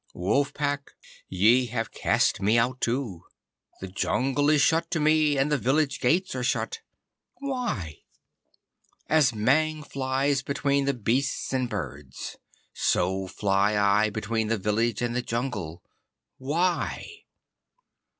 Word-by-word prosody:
Wolf 130 +11 +1
Pack, 145 -1 -3 0.3
ye 115 +7 +4
have 115 -1 -3
cast - - +1
me 105 +4 +3
out 125 +3 0
too. 115 -8 -2 0.6
The 95 - -5
jungle 135 +9 0
is 155 -1 +4
shut 165 +3 +2
to 170 - -1
me 155 -1 +3
and 135 +2 +1
the 145 - +2
village 140 +5 +1
gates 175 +9 +1
are 130 - -3
shut. 450 - -1 0.6
Why? 245 - -4 1.1
As 155 -5 +3
Mang 155 +8 +1
flies 135 0 0
between 140 0 0
the 140 -1 0
beasts 125 +5 -1
and 130 -2 0
birds, 75 - -6 0.4
so 95 +1 0
fly 100 +2 +1
I 105 +1 +3
between 110 +1 -2
the 115 +1 0
village 110 +3 0
and 120 0 -1
the 125 - +1
jungle. 115 - -4 0.6
Why? 170 +7 -1
125 Hz, 130 wpm, -26 LUFS, 105-145 Hz, 1.1 s, ye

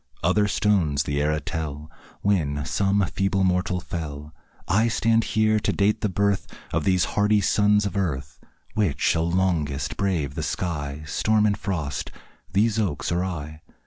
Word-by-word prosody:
Other 105 +5 +3
stones 90 -10 +2
the 70 0 -1
era 75 +1 +1
tell 75 0 -5 0.3
When 75 -8 0
some 100 +5 +1
feeble 95 0 0
mortal 90 0 +1
fell; 75 -4 -6 0.3
I 110 +6 +3
stand 115 0 +2
here 110 0 +4
to - - 0
date 105 +1 +1
the 105 - +1
birth 100 +1 0 0.3
Of 80 -2 0
these 95 -2 +3
hardy 105 +1 +3
sons 105 +1 +3
of 100 - -3
earth. 75 -8 -2 0.3
Which 100 -10 0
shall 85 0 +2
longest 80 -7 0
brave 90 -8 0
the - - -4
sky, 75 -4 -3
Storm 105 +7 +2
and 105 -1 +2
frost 90 -8 -3 0.4
these 110 +4 +2
oaks 90 -9 -1
or 85 +1 +1
I? 80 -4 -5
90 Hz, 155 wpm, -24 LUFS, 75-100 Hz, 0.4 s, here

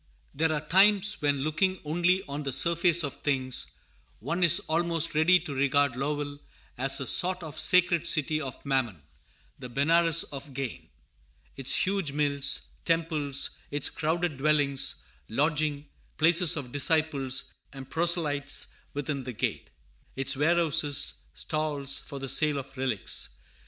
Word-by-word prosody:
] - - -37
THERE 160 +2 +1
are 150 0 -4
times 200 +3 +4
when, 140 -2 0
looking 185 +5 0
only 175 +4 +1
on 140 +1 -5
the 140 -2 -3
surface 170 +4 +2
of 140 - -6
things, 130 -3 -1 0.5
one 165 - -3
is 170 -1 +6
almost 165 0 0
ready 165 +4 +4
to 160 -4 -6
regard 140 -1 +1
Lowell 145 +1 -4 0.4
as 135 +2 +3
a 135 - -3
sort 180 +4 +2
of 155 -1 -6
sacred 175 -2 +3
city 155 -1 +1
of 135 -1 -8
Mammon, 125 - -2 0.6
the 125 -2 -8
Benares 165 +5 +3
of 140 -1 -9
gain: 135 -3 -6 0.7
its 135 -1 +3
huge 190 -7 0
mills, 140 -1 0 0.2
temples; 160 -4 -1 0.2
its 145 -1 -1
crowded 160 -1 -2
dwellings, 140 -1 +1 0.3
lodging 150 +3 -1 0.3
places 170 +1 +4
of 130 -4 -6
disciples 145 -2 0 0.2
and 135 -2 -11
"proselytes 160 -4 0 0.2
within 145 -1 -3
the 125 0 -6
gate;" - - -3 0.5
its 135 0 +2
warehouses, 155 -1 +2 0.2
stalls 145 - -1
for 140 - -9
the 135 0 -5
sale 150 +2 +4
of 135 0 -8
relics. 130 -6 -2
150 Hz, 140 wpm, -27 LUFS, 140-165 Hz, 0.7 s, is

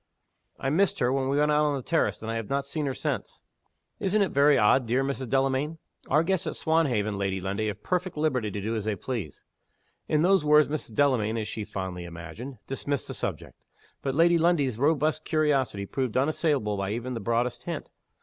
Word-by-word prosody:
"I 135 - -1
missed 190 +5 +2
her 125 -2 +1
when 135 -1 0
we 140 - +1
went 150 +1 +3
out 150 0 +3
on 145 -1 +1
the 135 - -4
terrace, 165 -7 0
and 110 - -3
I - - -2
have 115 -2 -4
not 140 0 0
seen 145 +1 -2
her 135 - -1
since." - - -4 0.6
"Isn't 200 +2 +2
it 190 - 0
very 140 +1 +5
odd, 115 +4 +4
dear 125 +4 +2
Mrs. 135 -2 -3
Delamayn?" 135 +4 +1 0.3
"Our 155 +4 +4
guests 190 +1 0
at - - -3
Swanhaven, 125 -11 +1
Lady 95 -1 -1
Lundie, 100 +3 -2
have 105 0 -5
perfect 180 -2 -1
liberty 130 -8 0
to 100 0 -5
do 110 +3 -2
as 110 -2 -3
they 110 -1 0
please." 100 - -5 0.6
In 155 0 +2
those 190 -2 +4
words 150 0 +5
Mrs. 145 -7 -4
Delamayn 115 -6 +2
(as 110 -1 -2
she 110 - -4
fondly 95 -4 -5
imagined) 85 - -8
dismissed 140 0 -3
the - - -3
subject. - - -5 0.4
But 135 -1 -2
Lady 170 +2 +5
Lundie's 145 -9 +2
robust 155 +2 +2
curiosity 140 -10 +1
proved 130 +2 -2
unassailable 135 -6 +1
by 100 0 -2
even 120 +3 -4
the 115 - -3
broadest 115 +3 -1
hint. - - -4
135 Hz, 205 wpm, -27 LUFS, 110-150 Hz, 0.6 s, very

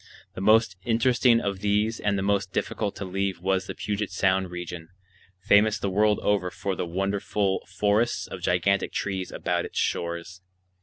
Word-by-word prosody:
The - - -6
most 110 -2 +4
interesting 120 +1 +3
of 100 -3 -2
these 105 +2 +1
and 100 -1 0
the 95 - -1
most 100 -1 0
difficult 105 +1 -2
to 100 - -5
leave 95 0 -2
was 95 +1 0
the - - -5
Puget 105 -1 -3
Sound 95 -1 +1
region, 90 -1 -7 0.5
famous 105 +2 +4
the 100 - -2
world 105 +2 +3
over 100 -3 +1
for 95 +1 -3
the 90 - -3
wonderful 95 +2 -1
forests 105 +3 +1
of - - -8
gigantic 90 +3 +1
trees 95 -2 -3
about - - -1
its - - -8
shores. 85 +2 -2
100 Hz, 165 wpm, -26 LUFS, 95-105 Hz, 0.5 s, most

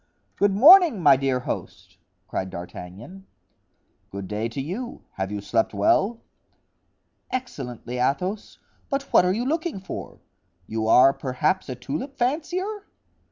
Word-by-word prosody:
"Good 200 -1 +2
morning, 320 - +8
my 145 -5 +6
dear 130 -1 0
host," - - -7 0.3
cried 95 - -3
D'Artagnan. 95 - -10 0.8
"Good 100 -1 -7
day 105 +3 -3
to 115 - -6
you; 195 - -5
have 95 +1 -4
you 105 -1 -4
slept 110 +1 0
well?" 195 - +2 1.1
"Excellently, 125 - -5
Athos, 180 +11 -2 0.3
but 275 0 -1
what - - +6
are 180 - +2
you 235 +5 -2
looking 320 - -2
for? 190 - -8 0.5
You 110 +2 -3
are 130 +4 +6
perhaps 145 +8 -1
a 130 - -4
tulip 160 - -6
fancier?" 355 - -2
150 Hz, 130 wpm, -24 LUFS, -, 1.1 s, morning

